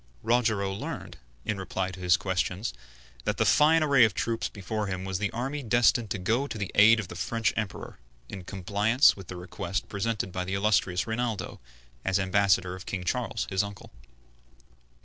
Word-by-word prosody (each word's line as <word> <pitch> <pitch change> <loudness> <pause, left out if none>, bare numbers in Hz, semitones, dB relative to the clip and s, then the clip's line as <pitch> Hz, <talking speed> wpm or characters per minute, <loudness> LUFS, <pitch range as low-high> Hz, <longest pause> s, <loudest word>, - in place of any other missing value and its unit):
Rogero 110 -5 +1
learned, 100 - -6 0.3
in 105 -2 -2
reply 95 0 -3
to 95 - -10
his 90 0 +4
questions, 95 +3 -2 0.5
that - - 0
the - - +2
fine 155 +2 +5
array 140 -4 +5
of 110 -5 +3
troops 115 -1 -1
before 105 +1 -4
him 95 0 -4
was 95 -1 -2
the 105 - 0
army 135 +7 -3
destined 120 -2 +3
to 105 - -2
go 115 +9 0
to 115 - -6
the 100 -3 -4
aid 110 +2 +7
of 105 - -4
the 85 - -9
French 115 +3 -1
Emperor, 110 -4 -5 0.3
in 95 -3 -8
compliance 105 +7 +3
with 95 -3 -11
the 95 - -7
request 90 +1 -4
presented 100 -1 -2
by 90 0 -2
the 95 +1 -3
illustrious 100 -3 +1
Rinaldo, 110 -3 -3 0.4
as 95 0 +1
ambassador 95 -2 +2
of 95 - -11
King 95 -2 -3
Charles, 90 - -2
his 95 0 +2
uncle. 100 -1 -8
100 Hz, 180 wpm, -28 LUFS, 95-115 Hz, 0.5 s, aid